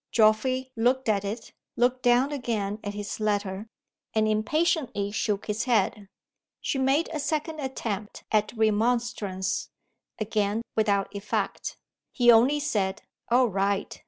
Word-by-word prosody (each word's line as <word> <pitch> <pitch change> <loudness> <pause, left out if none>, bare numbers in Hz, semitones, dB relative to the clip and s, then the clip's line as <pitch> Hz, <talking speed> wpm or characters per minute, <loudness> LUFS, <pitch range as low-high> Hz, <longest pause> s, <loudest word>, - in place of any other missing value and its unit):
Geoffrey 255 +4 +3
looked 250 +3 +1
at 205 -2 +2
it; 220 +3 -5 0.2
looked 250 +1 +2
down 245 +3 +3
again 220 -7 -2
at 205 0 -4
his 205 0 -5
letter; 205 -1 -1 0.5
and 215 0 +3
impatiently 220 - 0
shook 210 -1 -1
his 215 +2 -2
head. 210 -4 +1 0.5
She 270 - -2
made 270 +5 +2
a 305 - -2
second 310 +2 -2
attempt 225 -7 -4
at 215 -1 +2
remonstrance 220 -3 0 0.5
again 215 0 0
without 205 -2 +1
effect. 200 +1 -3 0.3
He 240 -2 +5
only 250 +6 +5
said, 195 -8 -1 0.3
"All 245 0 +4
right!" 200 +1 -1
220 Hz, 130 wpm, -27 LUFS, 205-255 Hz, 0.5 s, He